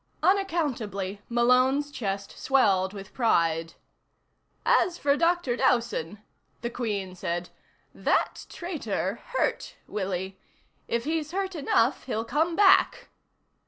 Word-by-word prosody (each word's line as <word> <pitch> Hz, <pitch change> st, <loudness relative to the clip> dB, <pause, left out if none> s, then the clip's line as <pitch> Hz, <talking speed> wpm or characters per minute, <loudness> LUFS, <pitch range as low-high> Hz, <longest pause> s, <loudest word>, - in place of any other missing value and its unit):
Unaccountably, 270 Hz, -, 0 dB
Malone's 255 Hz, +4 st, +3 dB
chest 200 Hz, -6 st, -3 dB
swelled 195 Hz, -8 st, +2 dB
with 195 Hz, -1 st, -10 dB
pride. 165 Hz, -9 st, +1 dB, 0.9 s
"As 350 Hz, 0 st, +3 dB
for 280 Hz, -3 st, +2 dB
Dr. 335 Hz, -5 st, +1 dB
Dowson," 230 Hz, -7 st, +1 dB, 0.4 s
the 235 Hz, 0 st, -3 dB
Queen 205 Hz, -7 st, -3 dB
said, 175 Hz, -1 st, -3 dB, 0.4 s
"that -, -, 0 dB
traitor 230 Hz, -, -3 dB, 0.2 s
hurt -, -, -1 dB
Willie. 190 Hz, -1 st, -4 dB, 0.5 s
If 235 Hz, 0 st, -1 dB
he's 315 Hz, +1 st, -2 dB
hurt 385 Hz, 0 st, -2 dB
enough, 275 Hz, -5 st, +1 dB
he'll 225 Hz, -3 st, -2 dB
come 320 Hz, +6 st, 0 dB
back." 390 Hz, 0 st, +4 dB
235 Hz, 105 wpm, -27 LUFS, 195-310 Hz, 0.9 s, back